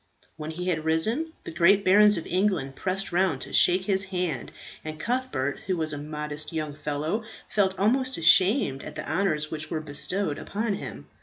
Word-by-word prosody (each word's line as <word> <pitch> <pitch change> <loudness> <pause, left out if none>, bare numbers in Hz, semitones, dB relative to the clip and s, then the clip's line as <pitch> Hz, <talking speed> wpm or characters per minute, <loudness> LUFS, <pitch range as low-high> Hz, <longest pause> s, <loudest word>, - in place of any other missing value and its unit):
When 155 0 -7
he 180 +3 -4
had 160 -3 -1
risen, 220 - +1
the - - -7
great 190 +5 +3
barons 205 +1 +6
of 165 - -5
England 180 -8 0
pressed 195 +1 -3
round 175 -6 +1
to - - -7
shake 185 +1 +4
his 190 -1 +2
hand, 180 -3 -3 0.3
and 155 0 -7
Cuthbert, 240 - -2
who 185 -2 0
was 155 -2 -1
a 145 - -5
modest 150 +1 -4
young 155 -2 -3
fellow, 150 +8 -3 0.2
felt 190 -2 +1
almost 255 +6 +1
ashamed 185 - +4
at - - -9
the 155 - -6
honours 155 -3 0
which 155 0 -4
were 160 - -2
bestowed 155 +3 0
upon 215 +1 -2
him. 200 - -7
175 Hz, 180 wpm, -26 LUFS, 155-200 Hz, 0.3 s, barons